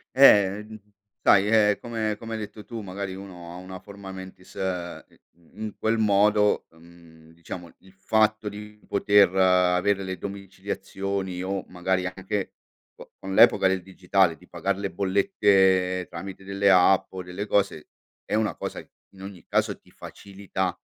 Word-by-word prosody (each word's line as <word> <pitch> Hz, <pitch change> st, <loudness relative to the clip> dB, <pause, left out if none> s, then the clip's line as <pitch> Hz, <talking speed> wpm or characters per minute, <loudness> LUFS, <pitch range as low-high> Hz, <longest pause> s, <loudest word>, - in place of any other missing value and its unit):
Eh! 105 Hz, -6 st, +6 dB, 0.6 s
Sai 100 Hz, 0 st, +5 dB
è 105 Hz, -2 st, +4 dB
come 110 Hz, -3 st, -2 dB
come 115 Hz, +1 st, -7 dB
hai 110 Hz, -, -3 dB
detto 105 Hz, 0 st, -8 dB
tu, 115 Hz, +1 st, -7 dB
magari 100 Hz, -1 st, -5 dB
uno 90 Hz, -3 st, -10 dB
ha -, -, -9 dB
una 95 Hz, 0 st, -9 dB
forma 100 Hz, -1 st, -11 dB
mentis 95 Hz, -1 st, -11 dB
ehm, 90 Hz, -2 st, -4 dB, 0.3 s
in 85 Hz, -1 st, -27 dB
in 105 Hz, -, -7 dB
quel 110 Hz, +1 st, 0 dB
modo, 105 Hz, 0 st, +3 dB
mhmm, 80 Hz, -1 st, -18 dB
diciamo 85 Hz, 0 st, -9 dB
il 95 Hz, -, -20 dB
fatto 110 Hz, +2 st, +1 dB
di 105 Hz, +1 st, -8 dB
poter 100 Hz, -2 st, +4 dB
avere 90 Hz, +1 st, +3 dB
le 95 Hz, -1 st, -4 dB
domiciliazioni 95 Hz, -1 st, -5 dB
o 95 Hz, 0 st, -3 dB
magari 95 Hz, +1 st, -1 dB
anche 95 Hz, +2 st, -4 dB, 0.4 s
co -, -, -14 dB
con 95 Hz, 0 st, -6 dB
l'epoca 115 Hz, -3 st, +6 dB
del 95 Hz, 0 st, 0 dB
digitale 95 Hz, -1 st, +1 dB
di 90 Hz, +3 st, -19 dB
pagar 95 Hz, +3 st, -2 dB
le 100 Hz, -1 st, -4 dB
bollette 95 Hz, -, +2 dB
tramite 95 Hz, +3 st, -8 dB
delle 100 Hz, 0 st, +2 dB
app 95 Hz, +1 st, +4 dB
o 95 Hz, -, -5 dB
delle 90 Hz, +3 st, -6 dB
cose 100 Hz, -7 st, 0 dB, 0.3 s
è -, -, -2 dB
una 110 Hz, -1 st, 0 dB
cosa -, -, -5 dB, 0.3 s
in 95 Hz, -, -16 dB
ogni 95 Hz, -2 st, -10 dB
caso -, -, 0 dB
ti -, -, -25 dB
facilita, 95 Hz, -1 st, -5 dB
95 Hz, 155 wpm, -25 LUFS, 90-100 Hz, 0.6 s, Eh